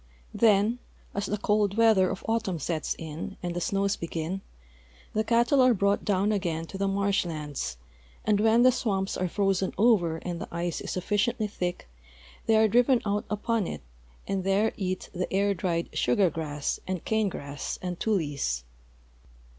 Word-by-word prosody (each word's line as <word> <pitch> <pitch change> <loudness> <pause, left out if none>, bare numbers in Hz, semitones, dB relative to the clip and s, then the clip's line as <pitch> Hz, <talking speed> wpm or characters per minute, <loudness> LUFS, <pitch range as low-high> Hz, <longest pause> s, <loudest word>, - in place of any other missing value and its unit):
Then, 220 +2 +3 0.3
as 200 - -2
the 210 - -1
cold 210 0 +1
weather 220 -5 +5
of 190 - -5
autumn 225 -5 0
sets 155 +1 -2
in 160 +4 -6
and 175 -1 -3
the 175 - -2
snows 200 +2 +1
begin, 170 +3 -4 0.7
the 215 - +1
cattle 235 +4 +3
are 255 -2 +5
brought 200 +1 +1
down 200 +1 +1
again 170 -6 -1
to - - -4
the 195 - +1
marsh 200 0 +1
lands, 150 - -4 0.5
and 210 -1 +3
when 225 +2 +5
the 255 - +7
swamps 200 -6 -1
are 185 - -1
frozen 195 0 0
over 195 -7 +3
and 175 0 -5
the - - -5
ice 170 0 -2
is - - -6
sufficiently 210 +5 0
thick 180 - -4 0.6
they 225 - +5
are 220 0 +5
driven 245 +3 +4
out 205 0 0
upon 210 -1 0
it - - -5 0.5
and 195 -1 -1
there 195 +3 +2
eat 185 -2 -3
the 180 0 -3
air 200 +1 +2
dried 170 -2 -1
sugar 175 +8 +3
grass 150 -2 -3
and 185 -2 -3
cane 220 -2 +1
grass 140 -4 -5
and 180 -1 -4
tules. 145 - -1
195 Hz, 170 wpm, -27 LUFS, 175-215 Hz, 0.7 s, the